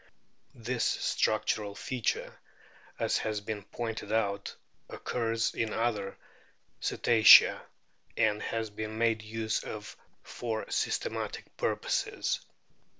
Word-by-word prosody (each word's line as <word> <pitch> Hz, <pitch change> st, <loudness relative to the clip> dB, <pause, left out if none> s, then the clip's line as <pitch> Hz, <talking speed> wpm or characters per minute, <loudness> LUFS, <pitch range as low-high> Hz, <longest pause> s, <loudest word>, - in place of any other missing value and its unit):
This 120 Hz, +1 st, -2 dB
structural 100 Hz, -2 st, 0 dB
feature, 125 Hz, -2 st, -2 dB, 0.6 s
as -, -, +1 dB
has 110 Hz, -1 st, -2 dB
been 105 Hz, 0 st, -5 dB
pointed 110 Hz, 0 st, -5 dB
out, 100 Hz, -3 st, -1 dB, 0.3 s
occurs 115 Hz, -1 st, -1 dB
in 110 Hz, -1 st, -1 dB
other 110 Hz, -4 st, -1 dB, 0.6 s
Cetacea, 110 Hz, -3 st, +7 dB, 0.6 s
and 105 Hz, -1 st, +2 dB
has 115 Hz, -2 st, -3 dB
been 110 Hz, +1 st, -5 dB
made 115 Hz, -1 st, +2 dB
use 110 Hz, 0 st, -2 dB
of 105 Hz, -1 st, -7 dB, 0.3 s
for 115 Hz, -2 st, -4 dB
systematic -, -, -2 dB
purposes. -, -, -1 dB
110 Hz, 95 wpm, -30 LUFS, 105-115 Hz, 0.6 s, Cetacea